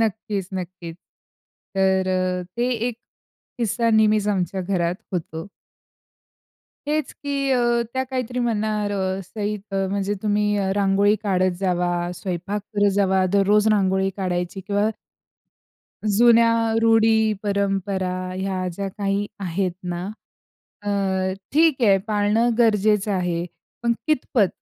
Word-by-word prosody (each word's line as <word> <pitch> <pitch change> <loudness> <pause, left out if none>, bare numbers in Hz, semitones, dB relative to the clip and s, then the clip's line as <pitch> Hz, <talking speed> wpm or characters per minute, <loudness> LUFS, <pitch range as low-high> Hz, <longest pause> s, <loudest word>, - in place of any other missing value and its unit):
नक्कीच, 210 -3 -1
नक्कीच. 175 -2 -6 0.8
तर 190 -1 +2 0.5
ते 240 +1 +1 0.2
एक 240 - -6 0.6
किस्सा 230 0 +1
नेहमीच 215 -1 +3
आमच्या 190 -2 -1
घरात 175 -2 0 0.2
होतो. 165 -1 -4 1.4
हेच 305 0 -1
की 280 -1 -2
अ, 240 -1 +2
त्या 260 - +1
काहीतरी 250 -1 -3
म्हणणार, 215 -3 0
अ, 190 -1 -1
सईद 210 +2 -4
अ, 195 0 +1
म्हणजे 200 0 -1
तुम्ही 205 -2 +1
रांगोळी 200 +1 +3
काढत 185 -3 +2
जावा, 175 -2 0
स्वयंपाक 185 +2 -4 0.2
करत 205 0 +4
जावा, 190 -2 +3
दररोज 205 +2 +4
रांगोळी 190 -1 +2
काढायची 180 -1 -2
किंवा 205 +2 0 1.2
जुन्या 230 +2 +5 0.3
रूढी 225 -1 +4
परंपरा, 195 -2 -1 0.2
ह्या 185 -1 -2
ज्या 195 +3 -4
काही 200 +1 -2
आहेत 185 0 -1
ना 175 0 -4 0.8
अ, 205 - -4 0.6
ठीक 310 -3 +3
आहे, 200 -3 +6
पाळणं 215 +3 +2
गरजेचं 210 -3 +3
आहे, 175 -2 -1 0.4
पण 235 0 +3
कितपत? 250 -8 +2
200 Hz, 115 wpm, -23 LUFS, 190-220 Hz, 1.4 s, आहे